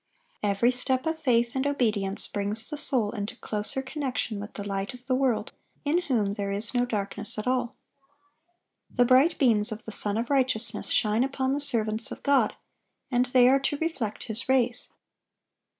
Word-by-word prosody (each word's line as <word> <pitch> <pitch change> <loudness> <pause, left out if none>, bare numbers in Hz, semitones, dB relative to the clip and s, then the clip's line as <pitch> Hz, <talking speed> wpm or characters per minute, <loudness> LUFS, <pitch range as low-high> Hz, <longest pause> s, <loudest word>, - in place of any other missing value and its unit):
(821) 205 - +1
Every 235 +5 +3
step 255 +2 0
of 320 0 -2
faith 240 -3 +1
and 265 +1 0
obedience 215 -8 +1
brings 210 +5 -1
the - - -3
soul 255 -8 +2
into 205 -2 -5
closer 215 +5 -3
connection 260 -6 -3
with 205 +1 -9
the 205 -1 -6
Light 195 +5 -4
of 250 0 -16
the 260 - -1
world, 255 -3 0 0.3
in 325 +5 +1
whom 225 - -1
"there 200 -1 -4
is 200 +2 -1
no 245 0 +1
darkness 210 0 +1
at 215 - -4
all." 250 -1 -1 1.1
The 245 - +2
bright 260 +7 +4
beams 220 -6 +2
of 215 0 -7
the 220 - -6
Sun 205 0 0
of 235 +4 -3
Righteousness 255 -4 +1
shine 215 +2 +2
upon 265 -1 -2
the 280 - -1
servants 225 -5 +3
of - - -9
God, 280 -1 +2 0.6
and 250 0 +1
they 250 -1 +4
are 270 +2 +4
to 275 +2 -2
reflect 270 -10 -4
His 225 +2 -5
rays. 245 -2 +2
245 Hz, 180 wpm, -26 LUFS, 215-265 Hz, 1.1 s, bright